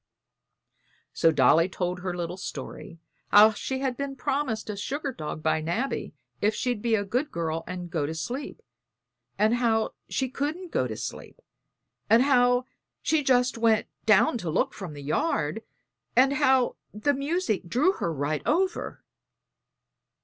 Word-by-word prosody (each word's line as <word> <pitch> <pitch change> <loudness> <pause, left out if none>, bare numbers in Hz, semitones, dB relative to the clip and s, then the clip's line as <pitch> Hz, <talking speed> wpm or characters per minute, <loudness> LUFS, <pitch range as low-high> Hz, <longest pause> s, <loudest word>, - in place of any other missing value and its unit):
So 165 - +4
Dolly 160 +5 +4
told 180 -1 -3
her 180 -1 -4
little 175 0 -3
story, 185 -2 -7 0.3
how 210 +2 +8
she 260 +5 -4
had 260 -2 -1
been 280 -1 -4
promised 265 -5 -2
a - - -5
sugar 275 +7 -3
dog 155 -4 -6
by 155 - +1
Nabby 175 - -2 0.3
if 210 +1 +2
she'd 245 -4 -1
be 230 -1 +2
a 205 -1 -1
good 250 +9 -1
girl 165 -1 -2
and 180 -1 -5
go 155 -5 -1
to 160 - -4
sleep, 245 - -5 0.7
and 215 +3 +3
how 230 -2 +1 0.2
she 265 - -1
couldn't 305 +7 -4
go 130 - +1
to 110 -2 -6
sleep, - - -7 0.7
and 230 +3 +6
how 245 -2 +3 0.4
she 315 -1 +2
just 250 -3 +2
went 225 -2 +3 0.2
down 225 +3 +4
to 175 - -4
look 160 - 0
from 180 -6 -7
the 145 -1 -9
yard, 155 - 0 0.5
and 265 +3 +5
how 265 -3 +3
the 215 +8 0
music 275 - -1
drew 270 - +3
her 170 - -3
right 150 0 -2
over. 370 +4 0
225 Hz, 155 wpm, -27 LUFS, 175-265 Hz, 0.7 s, how